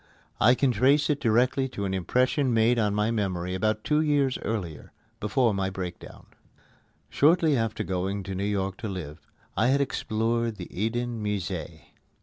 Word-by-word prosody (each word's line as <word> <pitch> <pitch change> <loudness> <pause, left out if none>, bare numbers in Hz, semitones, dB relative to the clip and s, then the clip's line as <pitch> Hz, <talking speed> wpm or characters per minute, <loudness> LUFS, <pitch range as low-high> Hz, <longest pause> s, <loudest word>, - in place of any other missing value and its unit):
I 120 +3 +6
can 135 0 +2
trace 135 +7 +3
it 145 - -1
directly 125 +3 +2
to 100 -5 -4
an 95 - -2
impression 125 - +1
made 115 +2 +3
on 105 -2 +1
my 105 +2 +1
memory 90 -5 -2
about 110 +3 0
two 150 0 +2
years 145 -4 +1
earlier, 90 -9 -5 0.3
before 115 +1 +1
my 95 -1 -1
breakdown. 95 -2 -7 0.8
Shortly 160 0 +3
after 115 -3 -1
going 95 +2 -2
to 95 0 -5
New 95 +1 -3
York 100 -2 -1
to 115 - -5
live, 85 -5 -6 0.4
I 110 - +2
had 135 +2 +3
explored 115 -3 -1
the 90 -4 -8
Eden 115 +2 -2
Musée. 105 -6 -4
110 Hz, 160 wpm, -26 LUFS, 95-125 Hz, 0.8 s, I